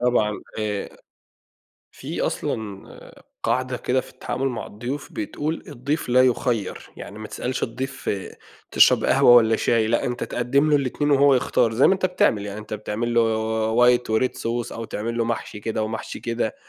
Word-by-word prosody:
طبعًا، 120 -4 +1 0.2
آآ 105 -2 -2 1.0
في - - -6
أصلًا 105 -3 -3 0.6
قاعدة 130 0 0
كده 130 +2 0
في - - -13
التعامل 135 +1 -3
مع 120 - -5
الضيوف 120 +7 -6
بتقول: 165 - -3
"الضيف 140 +5 -3
لا 125 +1 +5
يُخَيّر"، 120 -5 -1
يعني 100 - -9
ما 110 0 -7
تسألش 125 +1 -4
الضيف 130 +4 -3 0.6
تشرب - - +5
قهوة - - +5
والّا 110 -2 +5
شاي؟ 115 -2 +2
لأ، 115 +2 +1
أنت 125 0 -2
تقدّم 140 +5 +1
له 150 - +5
الاتنين 145 +2 -1
وهو 140 -1 +5
يختار 120 -2 +2
زي 130 - +5
ما 190 - +5
أنت 185 -1 0
بتعمل 110 - +1
يعني، 100 +1 -6
أنت 110 0 -6
بتعمل 110 +3 -3
له 120 - +5 0.6
white 125 0 +5
وred 110 +4 +2
sauce، 120 0 -3
أو 115 - -5
تعمل 115 +2 -4
له 115 - +2
محشي 115 -2 -4
كده 110 +1 -2
ومحشي 110 +1 -5
كده، 115 -2 -2
120 Hz, 170 wpm, -23 LUFS, 110-130 Hz, 1.0 s, لا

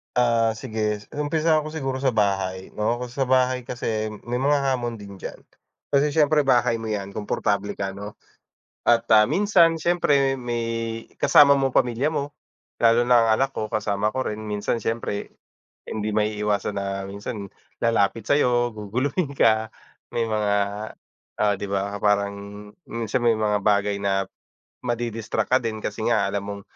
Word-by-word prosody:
Ah, 115 -2 +3
sige. 110 -2 -2 0.2
Umpisahan 155 +1 +1
ko 155 - -6
siguro 135 -4 -3
sa 130 0 +1
bahay, 95 -4 0
'no. 115 +3 0
Kung 125 - -4
sa 130 +3 -2
bahay 130 -1 +2
kasi, 110 -3 -3 0.2
may 120 - -2
mga 140 +3 +2 0.2
hamon 120 -3 -4
din 100 -1 -10
diyan. 95 - -8 0.5
Kasi 145 +1 +2
siyempre 150 0 +3
bahay 125 -3 +3
mo 115 -1 -4
'yan, 100 -2 -4
komportable 105 -1 -1
ka, 95 -1 -3
'no. 100 +1 -9 0.7
At, 120 0 +3
ah, 110 -1 +7
minsan 170 - +3
siyempre 140 -6 +2
may 115 -2 -3 0.2
kasama 140 -1 +6
mo 135 -1 0
pamilya 125 +6 +1
mo, 145 -1 -2 0.5
lalo 115 0 +4
na 120 -2 +6
ang - - +1
anak 135 0 -1
ko, 110 -1 -4
kasama 105 0 0
ko 130 - -1
rin. 105 -4 -3
Minsan 105 +2 -1
siyempre, 115 -2 -3 0.5
hindi 110 -1 -4
maiiwasan 105 -1 0
na 100 0 -3
minsan 100 +1 -7 0.2
lalapit 115 -2 +1
sa'yo, 120 -3 +2
guguluhin 130 - -2
ka. 110 -2 +3 0.4
May 115 - -1
mga 105 -2 0 0.8
oh, 105 -1 +2
'di 100 - -4
ba, 100 +1 -2
parang 100 -1 +2 0.6
yung 115 0 -4
minsan 115 +4 -1
may 120 -2 +3
mga 105 -1 +1
bagay 100 0 +1
na, 95 -1 +1 0.6
madi-distract 120 -2 -2
ka 130 - +4
din, 110 -1 -3
kasi - - -4
nga - - +2
alam 100 -1 -3
mong 100 0 -6
115 Hz, 160 wpm, -24 LUFS, 105-130 Hz, 0.8 s, ah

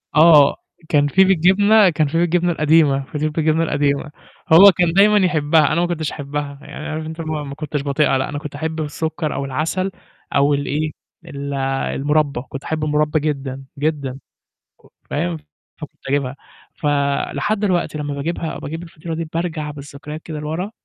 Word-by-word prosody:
آه، 155 -3 +7 0.3
كان 145 -1 +3
فيه 190 +7 +4
بالجبنة 195 +3 +5
كان 155 -2 +1
فيه 165 +3 0
بالجبنة 175 +1 +2
القديمة 150 -3 +3
فطير 150 +1 -2
بالجبنة 160 +1 +1
القديمة، 145 -1 0 0.4
هو 195 +4 +10
كان 175 -2 +1
دايمًا 210 +3 +5
يحبها 155 -2 +3
أنا 170 - +2
ما 175 - +1
كنتش 160 -3 -2
أحبها، 145 0 -5
يعني 155 - -8
عارف 155 0 -4
أنت 160 +1 -6
ما 155 -2 -3
ما 140 -1 -7
كنتش 150 -1 -3
باطيقها 140 -1 +1
لأ، 130 - -2
أنا 145 - -4
كنت 150 -2 -8
أحب 160 +2 -3
بالسُكّر 155 0 -3
أو 140 - -3
العسل، 165 +8 -2 0.4
أو 140 +1 +4
الإيه 145 +2 -1 0.3
ال 140 0 -6 0.4
المربى، 145 -2 0
كنت 135 - -7
أحب 155 -1 -3
المربى 150 +1 +1
جدًا، 135 -3 -3 0.2
جدًا. 140 -3 -2 0.9
فاهم، 85 -2 -1 0.4
فكنت - - -11
أجيبها، 140 -1 -1 0.4
ف 150 - -6 0.5
لحد 210 0 0
دلوقتي 180 -6 0
لمّا 145 -1 -3
باجيبها، 160 +3 -3
باجيب 160 +3 -6
الفطيرة 165 -1 -7
دي 165 - -3
بارجع 165 -3 -2
بالذكريات 145 +2 -9
كده 155 -2 -6
لورا، 160 +6 -4
155 Hz, 165 wpm, -20 LUFS, 145-165 Hz, 0.9 s, هو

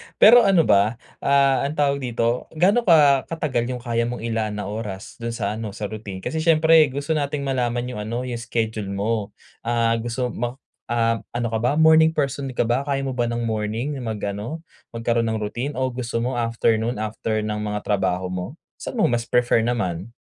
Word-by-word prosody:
Pero 235 +3 +8
ano 195 -7 +4
ba, 105 0 +3 0.2
ah, 140 -1 +3
anong 150 - -5
tawag 140 -2 +1
dito, 120 -1 -1
gaano 200 +8 +3
ka 145 -5 +5
katagal 145 -8 -1
'yong 125 -1 -5
kaya 115 0 0
mong 120 -1 -5
ilaan 110 -2 -2
na 105 -1 -4
oras, 105 -3 -6
do'n 115 0 -4
sa 105 -4 -2
ano, 105 -3 -6
sa 105 -1 -5
routine? 100 -3 -7
Kasi 160 - -2
siyempre, 160 0 +5
gusto 140 +3 -4
nating 145 -2 -1
malaman 125 -3 -1
'yong 125 - -6
ano, 115 +4 -3
'yong 125 -2 -4
schedule 110 -3 -2
mo. 100 +2 -2 0.2
Ah, 115 0 +1
gusto 120 +2 -2
ma 120 +2 -3 0.3
ah, 115 -1 +1 0.2
ano 120 -1 0
ka 110 - 0
ba, 120 +3 +1
morning 160 0 +5
person 140 -1 -1
ka - - +2
ba, 120 +5 0
kaya 135 -1 0
mo 135 - -2
ba 120 -2 -1
ng 120 0 -2
morning 115 +5 -2
mag-ano, 110 +5 -4 0.3
magkaro'n 115 0 0
ng 110 -1 -2
routine 120 +7 -4
o 130 0 -1
gusto 120 -2 -3
mo 125 0 -1
afternoon, 115 0 +1
after 110 0 -2
ng 105 0 -2
mga 105 0 -3
trabaho 95 -3 -1
mo? 90 - -5 0.2
Saan - - -6
mo 220 - +1
mas 120 -1 -1
prefer 125 -1 +3
naman? 110 -4 -2
120 Hz, 190 wpm, -23 LUFS, 110-135 Hz, 0.3 s, Pero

